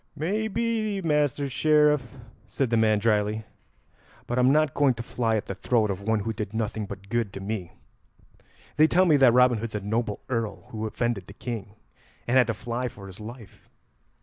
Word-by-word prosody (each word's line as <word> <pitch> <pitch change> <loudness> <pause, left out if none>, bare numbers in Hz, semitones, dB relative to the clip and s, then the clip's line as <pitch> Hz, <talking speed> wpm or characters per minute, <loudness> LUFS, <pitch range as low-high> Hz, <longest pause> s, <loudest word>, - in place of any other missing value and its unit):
"May 200 +9 -1
be, 220 -2 -1
Master 150 -4 +1
Sheriff," 150 +1 +3 0.5
said 120 +5 -1
the - - +3
man 110 -1 +3
drily; 105 0 +1 0.8
"but 120 +1 -1
I'm 125 +1 +5
not 155 -1 +3
going 140 -3 +3
to 115 - -6
fly 115 -2 -1
at 105 - -2
the - - -4
throat 110 +2 +1
of 95 0 -5
one 110 +1 0
who 110 +2 -2
did 105 0 -5
nothing 110 -1 -2
but 100 0 -9
good 115 -4 -1
to - - -6
me. 95 -3 -5 1.0
They 155 +1 +6
tell 185 +3 +4
me 160 -4 +5
that 135 -3 +6
Robin 125 -1 +4
Hood's 115 -1 -5
a - - 0
noble 105 +1 -2
earl 115 -5 -3
who 110 -1 -4
offended 115 -4 -2
the 100 - -11
King, 105 -3 -6 0.5
and 120 - +1
had 130 -2 +5
to 115 - -1
fly 120 +4 -3
for 100 -4 -10
his 95 +1 -11
life. 110 0 -11
115 Hz, 195 wpm, -26 LUFS, 105-140 Hz, 1.0 s, They